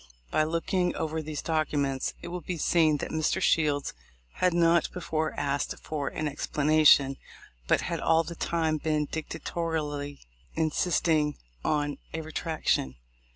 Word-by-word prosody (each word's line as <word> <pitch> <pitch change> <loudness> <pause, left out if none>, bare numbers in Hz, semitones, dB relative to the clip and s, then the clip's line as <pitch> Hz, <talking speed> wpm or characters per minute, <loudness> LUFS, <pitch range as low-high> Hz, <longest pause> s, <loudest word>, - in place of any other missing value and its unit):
By 155 - +3
looking 175 +3 0
over 160 0 -2
these 155 -1 -5
documents, 145 -4 0
it - - -5
will 180 0 -4
be 175 +2 -4
seen 155 -1 +3
that - - -5
Mr. 155 -1 +1
Shields 145 -3 +2 0.4
had 180 - +3
not 170 0 +3
before 160 -3 -2
asked 140 0 -1
for 145 -3 -4
an 155 - -3
expla 145 0 -3
nation, 150 -3 +6 0.5
but - - +3
had - - -3
all 165 0 +3
the 170 +1 -6
time 160 -2 0
been 155 -1 0
dictatorially 150 -2 -4 0.3
insist 160 +3 +1
ing 150 -3 +2 0.3
on 145 -1 0 0.2
a 160 - -2
retraction. 155 - -1
155 Hz, 145 wpm, -28 LUFS, 145-165 Hz, 0.5 s, nation